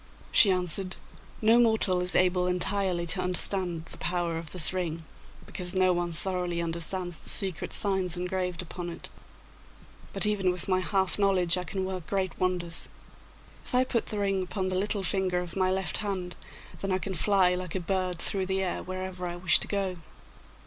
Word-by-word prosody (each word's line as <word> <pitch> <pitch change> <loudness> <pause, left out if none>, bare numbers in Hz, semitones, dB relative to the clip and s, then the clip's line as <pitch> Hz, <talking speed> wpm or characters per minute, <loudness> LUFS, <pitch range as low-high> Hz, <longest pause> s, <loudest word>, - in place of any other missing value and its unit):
She 205 - +8
answered, 185 0 0 0.5
'No 225 +2 +6
mortal 220 -6 +3
is 180 +1 +1
able 180 0 +3
entirely 180 -1 +1
to 180 +2 +1
understand 180 -2 0
the - - -11
power 175 -1 -1
of 165 -2 -8
this 180 -1 +2
ring, 165 -3 -3 0.4
because 180 0 -3
no 185 -1 +4
one 175 0 -1
thoroughly 180 0 -2
understands 170 +1 -3
the - - -4
secret 190 -3 -1
signs 190 -3 +1
engraved 180 -1 -2
upon 175 0 -6
it. 170 - -8 1.0
But - - +3
even 200 -3 +1
with 180 -1 -3
my 185 -1 +2
half 190 +1 +1
knowledge 185 -4 +3
I 180 0 -3
can 190 +2 -3
work 185 -3 -5
great 190 -2 -2
wonders. 180 -2 +1 0.7
If - - -5
I 250 - +5
put 245 -3 -1
the 210 - -3
ring 195 -1 0
upon 185 +1 -2
the 185 - -1
little 200 +1 +1
finger 190 -1 +1
of 180 -1 -4
my 185 -1 +2
left 190 0 0
hand, 185 -4 -3 0.4
then 195 - -3
I 185 - +2
can 190 +1 -4
fly 185 +1 +3
like 180 -1 -4
a - - 0
bird 185 0 -1
through 190 +2 -1
the 190 0 0
air 180 - -2
wherever 185 -1 -5
I 175 - -5
wish 175 -2 +4
to - - -3
go. 195 -3 -2
185 Hz, 185 wpm, -28 LUFS, 175-190 Hz, 1.0 s, She